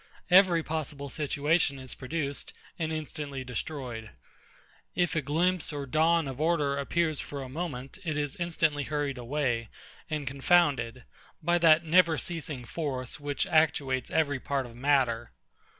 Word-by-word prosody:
Every 180 -3 +6
possible 150 -3 -4
situation 145 +1 +1
is 130 -1 -7
produced, 140 +1 -4 0.3
and 160 -1 -1
instantly 150 -3 -4
destroyed. 125 -3 -5 0.9
If 175 -4 +1
a 155 - +2
glimpse 170 +5 +1
or 145 -2 -4
dawn 160 +3 +3
of 135 +1 -5
order 150 -4 +2
appears 155 +1 0
for 140 -1 -5
a 130 - -8
moment, 135 -2 -5
it 155 -4 -2
is 145 -2 -2
instantly 165 -4 0
hurried 145 -3 -2
away, 120 -3 -1 0.4
and 150 -2 -2
confounded, 135 -4 +2 0.4
by 175 +2 +3
that 165 0 +6
never 165 -1 +5
ceasing 150 -7 -4
force 130 -1 -4
which 145 -1 -1
actuates 140 -5 +2
every 145 -4 +1
part 135 0 -1
of 120 -1 -11
matter. 125 -3 +1
145 Hz, 140 wpm, -29 LUFS, 135-160 Hz, 0.9 s, Every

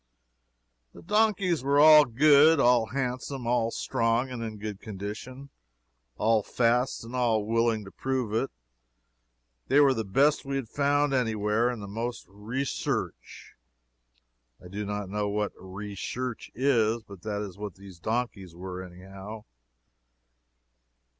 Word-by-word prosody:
The - - -12
donkeys 200 - +1
were 140 +1 +3
all 155 0 +9
good, 145 +5 +5
all 120 -3 +4
handsome, 130 +1 -3
all 120 -1 +1
strong 115 +3 0
and 125 -2 -5
in 110 -2 -5
good 105 -1 -6
condition, 110 +7 -7 0.7
all 110 0 +3
fast 120 +4 0
and 115 +2 -8
all 115 -4 +1
willing 115 -1 +1
to 95 - -11
prove 130 -5 -2
it. 115 +5 0 1.2
They 140 - +4
were 140 -2 +6
the 115 -3 -2
best 140 +10 +2
we 135 -1 -4
had 135 -4 -3
found 145 +1 +1
any 120 -4 +1
where, 105 +3 +1
and 120 -4 -5
the - - -7
most 115 +4 -4
'recherche'. 115 +7 -4 1.1
I 90 - -13
do 105 +2 -4
not 105 -1 -3
know 105 +1 -2
what 105 0 -1
'recherche' 105 +6 -6
is, 115 -4 +2
but 100 -4 -13
that 105 0 -3
is 100 -1 -9
what 105 -3 -6
these 95 -3 -13
donkeys 110 -5 -3
were, 90 +1 -6
anyhow. 95 +4 -10
115 Hz, 140 wpm, -27 LUFS, 105-130 Hz, 1.2 s, all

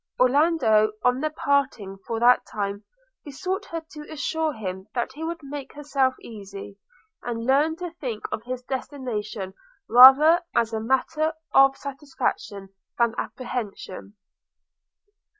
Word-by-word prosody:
Orlando, 255 -6 +3
on 250 +1 +3
their 310 +2 0
parting 270 -10 -1
for 225 -1 -2
that 245 +1 +5
time, 200 0 -4 0.4
besought 370 +8 -4
her 330 -1 -6
to 300 -1 -10
assure 315 +1 -1
him 190 -6 -6
that 240 +1 -1
she 305 +4 -7
would 330 -1 -4
make 280 0 -7
herself 275 -3 0
easy, 200 -2 -10 0.4
and 230 -1 -4
learn 290 +5 +3
to 355 0 -6
think 250 -10 -6
of - - -3
his 250 +1 -6
destination 230 -7 -5 0.3
rather 270 +8 +8
as 230 -1 +1
a 220 - -1
matter 305 +7 0 0.2
of 270 0 +6
satisfaction 265 -8 -4 0.3
than 235 -2 +2
apprehension. 215 -5 -6
255 Hz, 130 wpm, -24 LUFS, 220-295 Hz, 0.4 s, rather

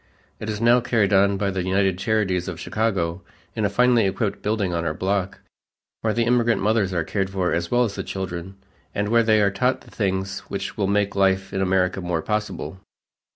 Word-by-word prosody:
It 110 - -5
is 105 -1 -3
now 120 +2 +5
carried 110 -5 +1
on 100 0 +4
by 100 0 0
the 95 -1 -2
United 95 0 +1
Charities 100 -3 0
of 90 -3 -5
Chicago 95 -6 -1 0.3
in 110 - 0
a - - +2
finely 120 0 +3
equipped 100 +1 -2
building 105 -4 -1
on 85 -1 -1
our 80 -2 -2
block, 95 0 -2 0.6
where 110 - +1
the 115 +2 +1
immigrant 120 -1 +2
mothers 105 -1 +1
are 85 -3 0
cared 95 +3 -2
for 95 -2 -1
as 85 0 -1
well 120 0 +3
as 110 -5 -2
the - - -4
children, 95 -1 -5 0.4
and 105 0 -1
where 115 +1 +5
they 110 -2 +3
are 100 -1 +3
taught 125 +7 0
the - - -17
things 95 -2 -2
which 100 -1 -4
will 100 -2 0
make 100 0 +1
life 95 0 +1
in 95 - -1
America 95 0 +1
more 85 -2 -2
possible. 105 -3 -3
100 Hz, 205 wpm, -23 LUFS, 95-110 Hz, 0.6 s, now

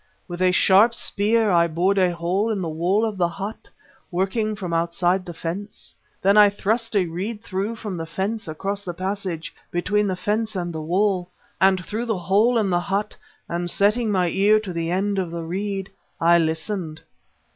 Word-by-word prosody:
With 175 -1 -6
a 185 0 +4
sharp 200 +6 +5
spear 220 -1 +2
I 170 -1 +4
bored 180 +5 +1
a 185 -1 +4
hole 180 +6 0
in 215 -3 -1
the - - -2
wall 175 +7 +1
of 215 -3 -3
the 175 - +3
hut, 195 +5 -7 0.4
working 200 +4 -1
from 185 -4 -5
outside 175 +2 +1
the - - -4
fence. 190 +6 -6 0.3
Then 200 +2 +4
I 210 -1 +8
thrust 220 +3 -1
a 195 -3 +3
reed 200 +7 -5
through 200 +2 -3
from 210 -5 -5
the 165 0 -5
fence 200 +5 -3
across 195 +6 -3
the 175 -3 -5
passage 185 -3 -4 0.2
between 205 +4 0
the 190 - -1
fence 210 +4 -1
and 175 -2 -3
the 160 - -4
wall, 180 +2 0 0.3
and 190 -1 +3
through 225 +3 -3
the 220 -4 0
hole 205 +7 +3
in 205 -4 +1
the 175 - +3
hut, 200 +4 -2 0.3
and 175 0 -2
setting 210 +4 +2
my 180 -3 +2
ear 205 +4 +4
to 195 -4 -6
the 165 0 -2
end 195 +2 0
of 180 -3 -2
the 170 0 -5
reed, 195 +3 -3 0.3
I 170 +1 +5
listened." 160 0 -2
190 Hz, 190 wpm, -23 LUFS, 175-210 Hz, 0.4 s, I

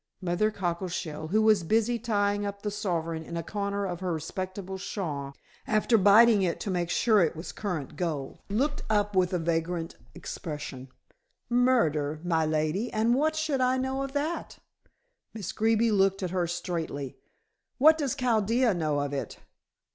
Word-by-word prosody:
Mother 185 +4 +1
Cockleshell, 170 -5 -3
who 215 +6 +2
was 215 -3 +5
busy 225 +6 +1
tying 205 -3 0
up 200 0 -5
the 210 - -1
sovereign 165 -6 -2
in 170 +1 -6
a 165 - -3
corner 200 +2 -2
of 175 -2 -4
her 185 -1 -2
respectable 185 +4 -5
shawl, 145 -9 -4 0.3
after 215 +2 +2
biting 210 +1 +6
it 175 -3 0
to 200 - -2
make 175 -2 -1
sure 215 +3 +3
it 165 -2 +1
was 160 +3 -6
current 175 -10 -4
gold, 155 -6 -3
looked 275 +9 0
up 205 -1 +1
with 185 -1 +3
a 180 - +1
vacant 165 0 -2 0.2
expression. 145 -6 -6 0.6
"Murder, 160 - +2
my 165 -2 +1
lady, 155 +9 0
and 225 +2 +2
what 310 +4 +2
should 310 -4 0
I 255 0 +3
know 265 +1 -1
of 275 0 -4
that?" 300 +4 -3 0.8
Miss 200 -4 -4
Greeby 225 +1 +2
looked 195 -1 +2
at 180 - -2
her 180 -2 0
straightly. 165 -6 -4 0.6
"What 315 +4 +6
does 280 -2 -1
Chaldea 235 -2 +2
know 155 -4 0
of 145 0 -3
it?" 140 - -4
195 Hz, 160 wpm, -28 LUFS, 165-225 Hz, 0.8 s, biting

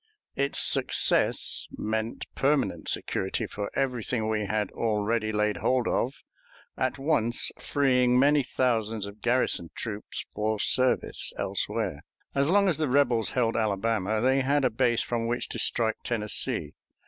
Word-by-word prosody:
Its 140 +1 -1
success - - +2
meant 110 +1 -3
permanent 140 0 0
security 95 - -1
for 100 0 -5
everything 125 -3 -1
we 105 -2 -1
had 105 -1 -1
already 110 0 -1
laid 105 0 0
hold 125 -2 +1
of, 130 +3 -1 0.5
at 130 +1 -1
once 135 -5 0
freeing 125 -3 +2
many 145 +3 +4
thousands 115 -5 -1
of 100 +1 -11
garrison 120 -8 +1
troops 105 -2 -5
for 110 +1 -1
service 130 +4 +1
elsewhere. - - -2 0.3
As 140 +2 +1
long 200 +2 +4
as 170 -4 +1
the 155 - +1
rebels 125 -4 +2
held 115 -2 +2
Alabama, 110 0 0
they 130 +2 +3
had 140 +1 +1
a 125 - +2
base 120 0 +2
from 115 -1 -2
which 120 +1 -1
to - - -3
strike 110 -2 +2
Tennessee. 105 -4 -1
115 Hz, 140 wpm, -27 LUFS, 110-130 Hz, 0.5 s, many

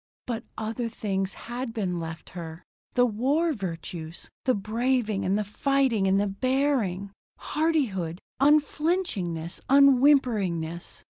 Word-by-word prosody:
But 235 -2 -3
other 230 +2 -3
things 195 -3 -2
had 240 0 -5
been 185 -5 -1
left 165 0 -7
her. 165 -1 -8 0.3
The 245 -1 +4
war 275 +9 +1
virtues! 170 - -6
The 255 - +3
braving 220 0 0
and 195 +2 +2
the 210 - 0
fighting 240 -1 +1
and 190 +1 +3
the 205 - +2
bearing. 205 -3 0 0.3
Hardihood. 245 - 0 0.2
Unflinchingness. 290 - +1
Unwhimperingness. 245 - +3
220 Hz, 115 wpm, -27 LUFS, 185-265 Hz, 0.3 s, The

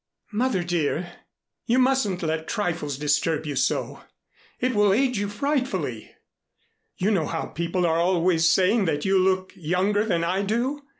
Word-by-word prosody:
"Mother, 225 -4 0
dear, 175 0 -1 0.6
you 240 +1 +2
mustn't 255 -9 +1
let 160 0 -2
trifles 165 - -2
disturb 150 +2 0
you 145 -2 -4
so. 130 - -1 0.6
It 255 +1 0
will 205 -2 +4
age 250 0 +1
you 205 0 -2
frightfully! 205 - -2 0.8
You 195 +4 +1
know 175 -7 +1
how - - -3
people 170 +2 -2
are 165 0 +2
always 170 -2 +3
saying 190 +5 +3
that 150 -3 -1
you 190 0 +3
look 185 0 +1
younger 185 +5 0
than 175 -6 0
I 185 +3 0
do. 240 +8 -1
185 Hz, 155 wpm, -24 LUFS, 165-210 Hz, 0.8 s, will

